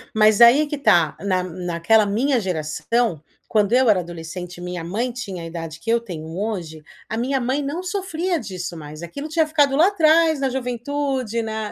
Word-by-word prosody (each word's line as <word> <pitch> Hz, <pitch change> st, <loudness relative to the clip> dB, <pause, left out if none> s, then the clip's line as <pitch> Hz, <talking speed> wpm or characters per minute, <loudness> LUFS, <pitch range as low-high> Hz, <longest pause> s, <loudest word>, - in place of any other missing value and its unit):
Mas, 215 Hz, +1 st, +4 dB
aí 235 Hz, +5 st, +8 dB
é -, -, +1 dB
que 295 Hz, 0 st, -4 dB
tá, 170 Hz, -, +3 dB
na 185 Hz, -2 st, 0 dB
naquela 180 Hz, +4 st, +1 dB
minha 245 Hz, +6 st, +1 dB
geração, 180 Hz, +2 st, -1 dB, 0.3 s
quando 210 Hz, 0 st, +1 dB
eu 255 Hz, -1 st, +4 dB
era 200 Hz, -3 st, +4 dB
adolescente 175 Hz, +1 st, -7 dB
e -, -, -10 dB
minha 180 Hz, -1 st, -5 dB
mãe 220 Hz, +9 st, -2 dB
tinha 200 Hz, -8 st, -6 dB
a -, -, -6 dB
idade 165 Hz, -1 st, -7 dB
que 225 Hz, -, -6 dB
eu 235 Hz, +1 st, +4 dB
tenho 175 Hz, -9 st, -8 dB
hoje, 180 Hz, -7 st, -4 dB, 0.3 s
a 220 Hz, -, -3 dB
minha 265 Hz, +3 st, 0 dB
mãe 260 Hz, +4 st, -1 dB
não 290 Hz, +6 st, -4 dB
sofria 365 Hz, -2 st, -2 dB
disso, 180 Hz, -, -6 dB
mais. 155 Hz, +1 st, -9 dB
Aquilo 280 Hz, -, -6 dB
tinha 320 Hz, 0 st, +1 dB
ficado 290 Hz, -3 st, +2 dB
lá 320 Hz, +6 st, +5 dB
atrás, 325 Hz, -5 st, +4 dB
na 270 Hz, -1 st, 0 dB
juventude, 255 Hz, -1 st, -2 dB
na 220 Hz, -1 st, -4 dB
225 Hz, 195 wpm, -22 LUFS, 180-275 Hz, 0.3 s, aí